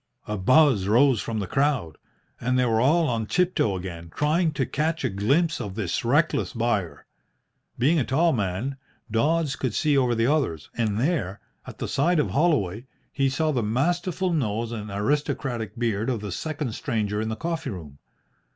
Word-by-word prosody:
A 105 Hz, -, -2 dB
buzz 125 Hz, 0 st, +4 dB
rose 120 Hz, +2 st, +4 dB
from 115 Hz, -, -4 dB
the 100 Hz, -, -1 dB
crowd, 135 Hz, -, 0 dB, 0.4 s
and 125 Hz, +1 st, 0 dB
they 125 Hz, -, +3 dB
were 115 Hz, -1 st, +2 dB
all 160 Hz, +5 st, +3 dB
on 115 Hz, -4 st, -1 dB
tiptoe 180 Hz, -, +1 dB
again, 85 Hz, -2 st, -7 dB
trying 155 Hz, +3 st, +2 dB
to 140 Hz, -3 st, 0 dB
catch 155 Hz, +5 st, -1 dB
a -, -, +1 dB
glimpse 135 Hz, -, +1 dB
of 100 Hz, -4 st, -5 dB
this 105 Hz, -2 st, -2 dB
reckless 145 Hz, +7 st, +1 dB
buyer. 115 Hz, -7 st, -1 dB, 0.7 s
Being 150 Hz, +7 st, +3 dB
a -, -, +2 dB
tall 160 Hz, +7 st, +2 dB
man, 110 Hz, +5 st, -2 dB, 0.3 s
Dodds 150 Hz, +5 st, +1 dB
could 125 Hz, -3 st, -3 dB
see 150 Hz, -2 st, +2 dB
over 125 Hz, -3 st, +2 dB
the 115 Hz, 0 st, +1 dB
others, 130 Hz, -, 0 dB
and 110 Hz, -3 st, 0 dB
there, 130 Hz, -, -1 dB, 0.3 s
at -, -, -9 dB
the -, -, -4 dB
side 165 Hz, +6 st, +2 dB
of 150 Hz, -, +1 dB
Holloway, 130 Hz, -, +1 dB, 0.3 s
he 135 Hz, 0 st, +2 dB
saw 155 Hz, +4 st, 0 dB
the 130 Hz, -5 st, 0 dB
masterful 175 Hz, -, 0 dB
nose 115 Hz, -6 st, -1 dB
and 105 Hz, -2 st, -5 dB
aristocratic 115 Hz, 0 st, -2 dB
beard 115 Hz, -1 st, 0 dB
of 120 Hz, -5 st, -1 dB
the 105 Hz, -2 st, -5 dB
second 145 Hz, -, -3 dB
stranger 105 Hz, -4 st, -2 dB
in 110 Hz, -, -2 dB
the 110 Hz, -, -2 dB
coffee 165 Hz, 0 st, -3 dB
room. 80 Hz, -, -8 dB
125 Hz, 180 wpm, -25 LUFS, 105-150 Hz, 0.7 s, buzz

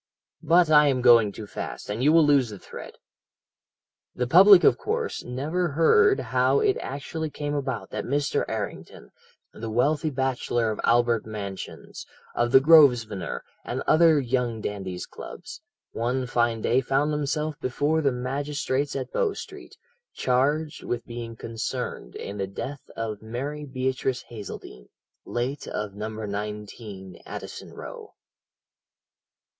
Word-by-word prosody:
"But 165 Hz, +1 st, +4 dB
I 150 Hz, -1 st, +7 dB
am 130 Hz, -3 st, +1 dB
going 115 Hz, -4 st, +6 dB
too 105 Hz, +2 st, -8 dB
fast, -, -, -6 dB
and 105 Hz, +4 st, -3 dB
you 150 Hz, -, +5 dB
will 165 Hz, -1 st, +6 dB
lose 140 Hz, -5 st, +4 dB
the 105 Hz, -, -8 dB
thread. -, -, -10 dB, 1.2 s
"The 125 Hz, -, 0 dB
public, 185 Hz, +7 st, +8 dB
of -, -, +6 dB
course, 455 Hz, +1 st, -3 dB
never 155 Hz, +9 st, -2 dB
heard 405 Hz, -, +5 dB
how -, -, +2 dB
it 415 Hz, -2 st, +2 dB
actually 155 Hz, +3 st, -4 dB
came 145 Hz, 0 st, -4 dB
about 140 Hz, -2 st, -3 dB
that -, -, -3 dB
Mr. 145 Hz, +2 st, 0 dB
Errington, -, -, -6 dB, 0.4 s
the 115 Hz, 0 st, -6 dB
wealthy 145 Hz, +7 st, +1 dB
bachelor 130 Hz, -4 st, 0 dB
of 105 Hz, -, -4 dB
Albert 120 Hz, -1 st, +2 dB
Mansions, 100 Hz, -3 st, -7 dB, 0.3 s
of 120 Hz, 0 st, 0 dB
the 135 Hz, -, +8 dB
Grosvenor, 130 Hz, -, +4 dB, 0.2 s
and -, -, -3 dB
other 160 Hz, -1 st, +5 dB
young 125 Hz, -3 st, -1 dB
dandies' 95 Hz, -4 st, -5 dB
clubs, -, -, -10 dB, 0.3 s
one 125 Hz, +3 st, -1 dB
fine 120 Hz, -2 st, 0 dB
day 125 Hz, +3 st, +3 dB
found 135 Hz, +3 st, +1 dB
himself 150 Hz, +1 st, -1 dB
before 145 Hz, +5 st, 0 dB
the 140 Hz, -3 st, +2 dB
magistrates 140 Hz, +2 st, -2 dB
at 135 Hz, -2 st, -4 dB
Bow 455 Hz, -5 st, +1 dB
Street, -, -, -10 dB, 0.4 s
charged 145 Hz, +5 st, 0 dB
with 120 Hz, -1 st, -3 dB
being 120 Hz, -1 st, -7 dB
concerned 115 Hz, -, -5 dB
in 100 Hz, +1 st, -6 dB
the 95 Hz, -, -1 dB
death 135 Hz, +8 st, -7 dB
of 110 Hz, -2 st, -4 dB
Mary 135 Hz, +7 st, -5 dB
Beatrice 130 Hz, -1 st, -2 dB
Hazeldene, 100 Hz, -, -9 dB, 0.4 s
late 125 Hz, +4 st, -3 dB
of 105 Hz, -2 st, -4 dB
No. 105 Hz, +2 st, -5 dB
19, 105 Hz, -2 st, -6 dB
Addison -, -, -8 dB
Row. -, -, -9 dB
130 Hz, 140 wpm, -26 LUFS, 115-150 Hz, 1.2 s, public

